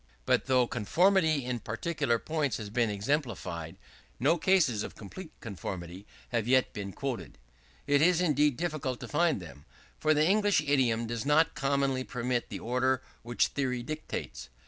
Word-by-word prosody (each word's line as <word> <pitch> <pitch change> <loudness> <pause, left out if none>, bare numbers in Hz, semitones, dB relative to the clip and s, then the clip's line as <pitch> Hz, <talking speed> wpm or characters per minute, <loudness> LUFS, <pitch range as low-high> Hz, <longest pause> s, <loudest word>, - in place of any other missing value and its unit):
But - - +2
though 130 -2 +4
conformity 160 - +2
in 125 -1 -2
particular 115 +2 -1
points 145 -2 -1
has 105 -2 -7
been 115 -1 +1
exemplified, 100 - -2 0.4
no 140 +7 +4
cases 160 - +3
of - - -6
complete 155 - -9
conformity 95 -2 -7 0.2
have 115 -2 -1
yet 130 0 +3
been 100 -2 -5
quoted. 110 - -5 0.5
It 145 0 +3
is 175 +1 +4
indeed 150 -6 +2
difficult 155 -7 -2
to - - -6
find 165 -4 +2
them; 80 -5 -11 0.4
for 155 0 +3
the 150 +1 +4
English 205 -1 +3
idiom 130 -6 +2
does 115 -1 -3
not 150 +3 +3
commonly 140 -2 0
permit 125 -1 -2
the - - -5
order 130 +2 0 0.2
which 120 +1 +1
theory 125 -3 -2
dictates. 135 - -6
130 Hz, 155 wpm, -30 LUFS, 115-155 Hz, 0.5 s, though